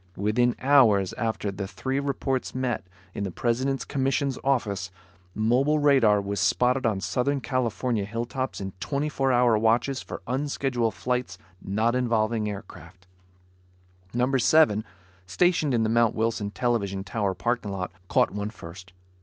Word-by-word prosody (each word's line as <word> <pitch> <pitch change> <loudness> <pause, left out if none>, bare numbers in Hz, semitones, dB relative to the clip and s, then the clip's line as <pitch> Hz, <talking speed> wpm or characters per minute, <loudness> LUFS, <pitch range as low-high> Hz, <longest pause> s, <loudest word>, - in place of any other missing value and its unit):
Within 120 +5 +1
hours 115 -9 +4
after 110 -2 -2
the 95 0 -5
three 130 +6 -3
reports 135 -2 -2
met, 125 -7 -2 0.3
in - - -4
the 100 - -2
President's 125 +6 -1
commission's 135 0 -1
office, 105 -8 0 0.5
mobile 125 +8 +2
radar 135 -8 +4
was 100 0 -3
spotted 125 +6 +2
on 105 -3 0
Southern 140 +6 0
California 120 -2 -1
hilltops 120 +5 -4
in 95 -1 -5
twenty 145 +6 -2
four 135 -2 0
hour 120 -3 +4
watches 120 +4 +1
for - - -8
unscheduled 130 -3 -1
flights 125 0 -2 0.2
not 110 +4 0
involving 115 -3 0
aircraft. 95 -2 -10 1.1
Number 125 +3 +1
Seven, 115 -6 +4 0.4
stationed 165 - +2
in 115 -3 +2
the - - +1
Mount 115 0 +2
Wilson 110 -2 -1
television 100 -4 -1
tower 100 -1 -2
parking 120 -3 -1
lot, 90 -2 -4 0.2
caught - - +2
one 105 +1 -3
first. 90 -2 -11
120 Hz, 140 wpm, -26 LUFS, 105-130 Hz, 1.1 s, hours